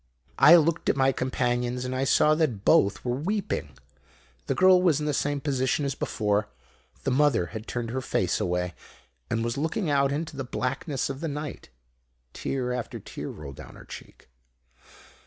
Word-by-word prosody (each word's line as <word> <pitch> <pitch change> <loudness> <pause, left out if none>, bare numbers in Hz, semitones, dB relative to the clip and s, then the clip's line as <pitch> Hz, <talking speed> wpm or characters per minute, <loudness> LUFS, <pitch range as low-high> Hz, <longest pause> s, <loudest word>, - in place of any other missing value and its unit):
"I 170 - +9
looked 170 0 +2
at - - +3
my 135 0 +3
companions 125 -1 -1
and 125 - -3
I 130 +1 0
saw 150 +2 +4
that 140 -11 0
both 100 +4 +3
were 120 0 0
weeping. 200 +8 -3 0.7
The - - 0
girl 185 -1 +6
was 165 -5 +3
in 150 - -3
the 150 - 0
same 145 +1 0
position 135 0 0
as 140 - -1
before. 105 -4 -1 0.6
The 135 - 0
mother 130 -7 +3
had 110 +1 -6
turned 120 -2 -3
her 130 +2 -2
face - - 0
away, 90 0 -1 0.6
and 115 0 0
was 120 +3 -2
looking 160 +2 -1
out 140 -1 +3
into 150 +1 -3
the 135 - -3
blackness 135 +3 -2
of 135 - -7
the 165 - -2
night. 150 0 -6 0.6
Tear 125 -2 -2
after 125 -2 -4
tear - - -7
rolled 70 -3 -9
down - - -11
her - - -13
cheek. - - -12
135 Hz, 175 wpm, -26 LUFS, 120-150 Hz, 0.7 s, I